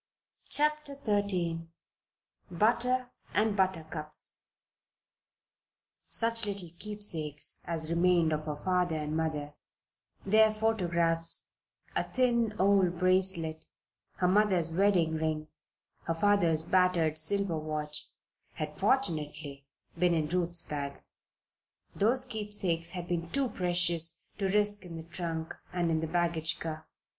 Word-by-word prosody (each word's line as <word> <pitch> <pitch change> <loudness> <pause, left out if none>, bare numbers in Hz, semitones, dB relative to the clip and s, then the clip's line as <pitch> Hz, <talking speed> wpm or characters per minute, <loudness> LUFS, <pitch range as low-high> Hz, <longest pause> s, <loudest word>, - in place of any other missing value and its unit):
CHAPTER 300 -1 +3
XIII 180 -6 0 0.8
BUTTER 245 +7 +1 0.2
AND 215 0 +2
BUTTERCUPS 160 -5 -2 1.7
Such 230 -1 +4
little 195 -5 -5
keepsakes 170 -9 -1
as 160 -1 -3
remained 170 -1 +3
of 155 0 -3
her 150 -1 -3
father 180 +1 0
and 150 0 -3
mother 155 -2 -2 0.7
their 215 +2 +5
photographs, 170 -7 +1 0.4
a - - +2
thin 235 -4 +1
old 190 -3 +3
bracelet, 185 -3 +2 0.5
her 180 - 0
mother's 185 -4 +3
wedding 175 -3 +2
ring, 155 -1 -2 0.6
her 165 - -1
father's 170 -4 +3
battered 170 -3 +2
silver 180 0 +2
watch 150 -1 -4 0.5
had - - -5
fortunately 150 - -1 0.3
been 175 -1 +3
in 155 -2 0
Ruth's 175 -1 0
bag. 140 -1 -5 0.9
Those 250 +5 +3
keepsakes 205 -8 -1
had 175 -2 -5
been 170 -1 -3
too 275 +2 0
precious 175 -3 +1 0.2
to 195 - 0
risk 205 0 +4
in 175 -2 -9
the 160 - -7
trunk 165 -1 -5 0.2
and 175 -2 0
in 160 - +1
the 160 - -3
baggage 165 -1 0
car. 160 -1 -6
175 Hz, 115 wpm, -30 LUFS, 160-205 Hz, 1.7 s, their